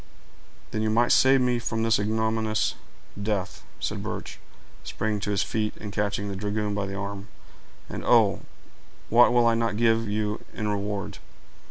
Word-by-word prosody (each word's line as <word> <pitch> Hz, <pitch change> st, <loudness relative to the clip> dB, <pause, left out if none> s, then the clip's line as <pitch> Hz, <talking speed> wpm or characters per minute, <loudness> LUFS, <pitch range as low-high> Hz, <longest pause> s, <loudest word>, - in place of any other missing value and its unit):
"Then 110 Hz, -, -2 dB
you 110 Hz, -, +1 dB
might 120 Hz, +2 st, +3 dB
save 135 Hz, 0 st, +5 dB
me 125 Hz, -1 st, +2 dB
from 115 Hz, -1 st, -2 dB
this 115 Hz, -1 st, +3 dB
ignominious 110 Hz, +1 st, 0 dB, 0.5 s
death," 100 Hz, -2 st, -2 dB, 0.2 s
said -, -, -3 dB
Birch, -, -, -6 dB, 0.4 s
springing 110 Hz, -1 st, -2 dB
to 105 Hz, -, -4 dB
his 100 Hz, -1 st, +1 dB
feet, 110 Hz, -1 st, -2 dB
and 105 Hz, -1 st, -7 dB
catching 100 Hz, 0 st, -1 dB
the 100 Hz, -, -4 dB
dragoon 105 Hz, +1 st, -2 dB
by 100 Hz, -1 st, -2 dB
the 95 Hz, -, -5 dB
arm. 100 Hz, +1 st, -5 dB, 0.6 s
"And, -, -, -6 dB
oh! -, -, +4 dB, 0.7 s
what 120 Hz, +2 st, +6 dB
will 120 Hz, -1 st, +4 dB
I 115 Hz, -, +4 dB
not 115 Hz, -2 st, 0 dB
give 115 Hz, -1 st, +2 dB
you 105 Hz, 0 st, -2 dB
in 110 Hz, -, -2 dB
reward!" 100 Hz, -1 st, -3 dB
110 Hz, 165 wpm, -26 LUFS, 100-115 Hz, 0.7 s, what